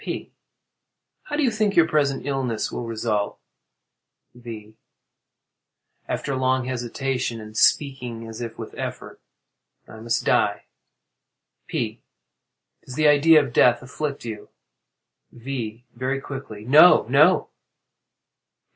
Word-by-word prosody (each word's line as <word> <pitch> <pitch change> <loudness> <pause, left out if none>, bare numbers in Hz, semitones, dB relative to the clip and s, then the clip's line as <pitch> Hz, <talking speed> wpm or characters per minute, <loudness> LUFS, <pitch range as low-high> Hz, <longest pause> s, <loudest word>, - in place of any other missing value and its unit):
P. - - -6 0.9
How 295 - -4
do 300 - +1
you 250 - +2
think 215 -2 0
your 165 -1 +5
present 145 -4 0
illness 130 -5 -2
will 120 - -5
result? 110 -2 -2 1.0
V. 110 -3 -10 1.3
[After 140 - -3
a - - -2
long 130 0 +1
hesitation 125 -1 -3
and 110 0 -11
speaking 125 -3 +1
as 115 +1 -8
if 115 -1 -6
with - - -8
effort.] - - -7 0.7
I 110 - -12
must 115 +1 -1
die. - - +2 1.0
P. - - -3 0.8
Does 125 - -9
the 155 +1 +3
idea 150 +1 +6
of 130 -4 -7
death 125 0 +4
afflict 140 +1 -5
you? 110 -2 -7 0.8
V. 120 -2 -6
[Very 130 +3 -2
quickly.] 135 -7 -8
No—no! 155 +8 +6
125 Hz, 115 wpm, -23 LUFS, 115-140 Hz, 1.3 s, idea